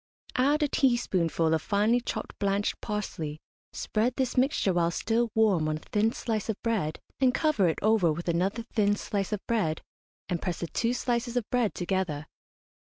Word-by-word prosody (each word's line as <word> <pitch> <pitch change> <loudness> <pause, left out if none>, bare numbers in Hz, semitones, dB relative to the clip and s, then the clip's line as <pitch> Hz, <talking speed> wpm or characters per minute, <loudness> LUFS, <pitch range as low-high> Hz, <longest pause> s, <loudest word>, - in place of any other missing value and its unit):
Add 290 +4 +3
a - - +3
teaspoonful 185 - +1
of 160 - +2
finely 215 +4 +2
chopped - - -4
blanched 200 0 0
parsley, 165 -8 -4 0.3
spread 230 +3 -1
this 260 -2 0
mixture 255 -7 +2
while 170 -1 +2
still 225 +6 0
warm 195 -8 +3
on 155 - -1
a - - -9
thin 215 +6 +1
slice 225 -2 -3
of 215 - -2
bread, 210 -10 0 0.2
and 255 -2 +3
cover 305 - +2
it 160 - 0
over 215 -6 +4
with 170 +3 -5
another 190 +7 0
thin 205 -2 +3
slice 200 -1 -3
of 210 -2 -3
bread, 200 -9 0 0.4
and 175 -2 -2
press 180 -3 -2
the - - 0
two 230 +8 0
slices 240 0 -1
of 235 - -1
bread 245 -4 +1
together. 175 -5 -1
210 Hz, 175 wpm, -28 LUFS, 175-235 Hz, 0.4 s, over